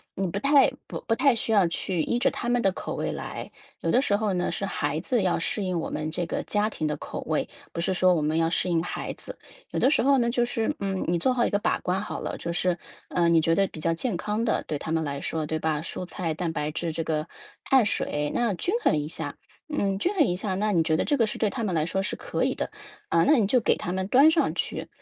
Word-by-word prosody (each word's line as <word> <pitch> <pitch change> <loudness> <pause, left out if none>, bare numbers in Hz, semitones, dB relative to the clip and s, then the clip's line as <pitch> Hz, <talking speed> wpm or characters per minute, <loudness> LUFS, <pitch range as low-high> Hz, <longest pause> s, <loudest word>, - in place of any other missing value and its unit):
你 195 - -1
不 200 +3 -3
太 275 +3 +5 0.2
不 - - -6
不 225 - +3
太 260 0 +4
需 225 - -2
要 200 -5 +5
去 170 +1 -1
依 240 - 0
着 - - +3
他 240 - -4
们 245 -1 +2
的 195 - +3
口 - - -5
味 - - -2
来， - - -6 0.3
有 - - 0
的 250 - +4
时 205 -7 +2
候 210 -1 0
呢 180 0 0
是 195 - -2
孩 150 -6 -1
子 240 +5 +1
要 180 - +2
适 205 +5 -1
应 185 -2 -1
我 - - -3
们 155 +1 -3
这 175 +1 -1
个 - - -2
家 210 +1 +1
庭 155 -7 -2
的 150 - -1
口 - - -6
味， - - 0 0.3
不 - - -4
是 190 - 0
说 185 0 +4
我 160 - 0
们 155 +2 0
要 165 0 +2
适 180 - 0
应 165 -2 +2
孩 - - -4
子。 - - -9 0.3
有 - - -1
的 - - +4
时 - - +3
候 275 +1 +5
呢， 235 -2 +2
就 240 0 +2
是， 230 -2 -1
嗯， 195 -2 -1
你 175 0 +1
做 255 +9 +2
好 240 -1 +2
一 - - +1
个 205 - +2
把 - - +1
关 185 +2 -1
好 210 - -5
了， - - -3
就 170 - -4
是， 175 0 +1 0.3
呃， 170 -1 +2
你 165 -1 +5
觉 165 +1 +2
得 195 +1 +3
比 160 - -10
较 165 +1 +2
健 205 +5 -2
康 210 +5 -1
的 220 - +1
对 150 - -2
他 160 - -5
们 160 0 +1
来 140 -2 -3
说， 160 -1 -2
对 160 +1 -2
吧？ 155 -1 0
蔬 175 - -5
菜、 175 -2 -3
蛋 165 +1 -2
白 150 -1 -2
质 165 +2 -2
这 165 +1 -2
个 155 0 -1 0.4
碳 260 -5 +5
水， 150 -7 -1
那 240 -4 +1
均 355 - -1
衡 - - +3
一 150 0 -2
下， 160 - -4 0.3
嗯， 200 -10 0
均 370 - +1
衡 325 - +5
一 180 - 0
下， 190 0 -2
那 210 +2 +1
你 175 -4 +3
觉 160 0 +2
得 - - +1
这 290 - +2
个 230 -4 +3
是 - - -4
对 220 - +2
他 230 - -3
们 190 -5 -1
来 155 -1 +2
说 190 +2 -1
是 195 - -2
可 - - -2
以 - - +1
的， - - -3 0.4
啊， 165 0 +4
那 305 - +5
你 225 - +3
就 245 +6 +3
给 225 - +2
他 175 - -4
们 190 0 -2
端 275 +8 +6
上 325 0 +2
去。 - - -3
185 Hz, 305 characters per minute, -26 LUFS, 165-225 Hz, 0.4 s, 端